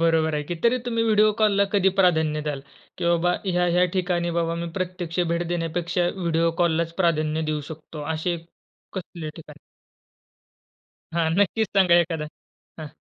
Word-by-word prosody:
बरोबर 160 -1 +2
आहे 150 - -1
की. 175 - -4
तरी 235 +2 +3
तुम्ही 230 -1 0
व्हिडिओ 215 -1 +4
कॉलला 205 -2 +4
कधी 195 -2 +4
प्राधान्य 160 -4 +2
द्याल 145 -2 -3 0.4
की, 180 - -3
"बाबा, 170 +1 +2
ह्या-ह्या 180 -1 +2
ठिकाणी, 175 -2 0
बाबा, 165 0 0
मी 170 0 -4
प्रत्यक्ष 180 -2 -3
भेट 170 +1 -1
देण्यापेक्षा 175 +1 -1
व्हिडिओ 165 -2 +1
कॉललाच 165 -1 +1
प्राधान्य 155 -2 +1
देऊ 150 -1 -1
शकतो," 155 -1 -8
असे 170 +2 -1 0.6
कसल्या 170 -4 -6
ठिकाणी? 150 -2 -12 1.6
हां. 165 -1 +1
नक्कीच 205 +2 +2
सांगा 180 -3 +5
एखादा. 165 -2 +2 0.5
हां. 155 -1 -6
170 Hz, 150 wpm, -24 LUFS, 160-180 Hz, 1.6 s, सांगा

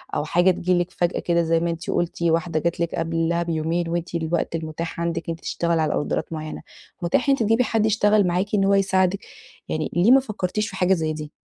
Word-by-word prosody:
أو 150 - -1
حاجة 175 +4 +3
تيجي 180 0 0
لِك 175 +1 -2
فجأة 175 0 -1
كده 170 -1 +1
زي 165 0 +2
ما 170 0 -1
أنتِ 165 0 -5
قلتِ، 175 0 -2
واحدة 165 -1 +1
جات 170 +2 -2
لِك 170 -1 -1
قبلها 165 +1 0
بيومين 165 +1 -1
وأنتِ 170 +1 -3
الوقت 165 0 -1
المتاح 165 +1 -5
عندِك 170 0 -2
إن 165 - -1
أنتِ - - -19
تشتغلي 170 -1 0
على 155 - 0
أوردرات 150 - -2
معيّنة، 155 0 -6 0.4
متاح 175 +11 +1
إن 275 - +5
أنتِ 230 - -1
تجيبي 225 +4 +3
حد 220 -1 +1
يشتغل 210 -2 +3
معاكِ 185 +4 0
إن 195 - +2
هو 200 - +3
يساعدِك؟ 190 0 +2 0.5
يعني 155 0 -2
ليه 185 +8 +4
ما 270 - +8
فكّرتيش 215 -3 -3
في 190 - -9
حاجة 185 0 +3
زي 160 -3 -1
دي؟ 150 -1 -7
170 Hz, 225 wpm, -23 LUFS, 165-190 Hz, 0.5 s, ما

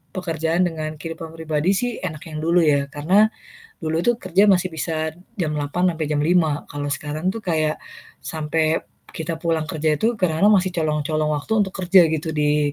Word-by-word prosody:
pekerjaan 165 -1 0
dengan 155 -2 -4
kehidupan 165 +1 -7
pribadi 160 +2 0
sih 245 +5 0
enak 155 -5 -5
yang 155 - -5
dulu 170 +2 +3
ya 140 -2 +2
karena, 170 +9 +3 0.5
dulu 160 0 -1
itu 240 - +4
kerja 185 +2 +3
masih 185 0 +2
bisa 160 -1 -3 0.3
jam 155 -3 0
8.00 150 +6 0
sampai 160 - -2
jam 145 - +1
5.00 160 -2 +2
kalau 145 0 -4
sekarang 155 +5 -3
tuh 225 - -6
kayak, 155 -3 0 0.4
sampai 155 0 -1 0.3
kita 160 +1 -4
pulang 160 -1 -1
kerja 155 -1 0
itu 230 +1 +1
kadang-kadang 180 0 +2
masih 185 0 0
colong 155 -3 -1
colong 155 0 0
waktu 145 +9 -4
untuk 190 -2 -1
kerja 185 +1 +7
gitu 160 0 -2
di, 150 -1 +1
160 Hz, 180 wpm, -22 LUFS, 155-180 Hz, 0.5 s, kerja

